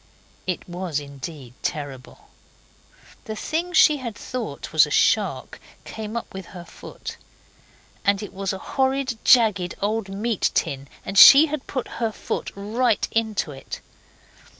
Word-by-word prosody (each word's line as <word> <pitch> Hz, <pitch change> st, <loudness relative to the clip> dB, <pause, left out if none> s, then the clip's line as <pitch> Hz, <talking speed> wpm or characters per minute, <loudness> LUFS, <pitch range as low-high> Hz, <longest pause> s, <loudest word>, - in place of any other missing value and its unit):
It 180 Hz, -, -3 dB
was 175 Hz, -4 st, -3 dB
indeed 140 Hz, -2 st, -9 dB
terrible. 140 Hz, -4 st, -6 dB, 1.0 s
The 220 Hz, -2 st, -5 dB
thing 330 Hz, +9 st, -2 dB
she 305 Hz, -4 st, +5 dB
thought 240 Hz, +2 st, -6 dB
was -, -, +6 dB
a -, -, -8 dB
shark -, -, +1 dB, 0.3 s
came 220 Hz, +1 st, -6 dB
up -, -, -6 dB
with 190 Hz, -2 st, -8 dB
her 175 Hz, -, -9 dB
foot, -, -, -9 dB, 0.9 s
and 200 Hz, +1 st, +2 dB
it 205 Hz, -, -8 dB
was 195 Hz, 0 st, -2 dB
a 190 Hz, -, -4 dB, 0.2 s
horrid, 265 Hz, -3 st, 0 dB
jagged, 210 Hz, -8 st, +4 dB
old 210 Hz, 0 st, -1 dB
meat 210 Hz, +2 st, 0 dB
tin, 135 Hz, 0 st, -1 dB, 0.2 s
and 195 Hz, +1 st, +2 dB
she 280 Hz, +3 st, +11 dB
had 300 Hz, -3 st, -4 dB
put 260 Hz, -3 st, -3 dB
her 225 Hz, -1 st, +1 dB
foot -, -, -4 dB
right 220 Hz, +3 st, 0 dB
into 220 Hz, -8 st, -1 dB
it. 135 Hz, -1 st, -8 dB
210 Hz, 140 wpm, -23 LUFS, 175-235 Hz, 1.0 s, she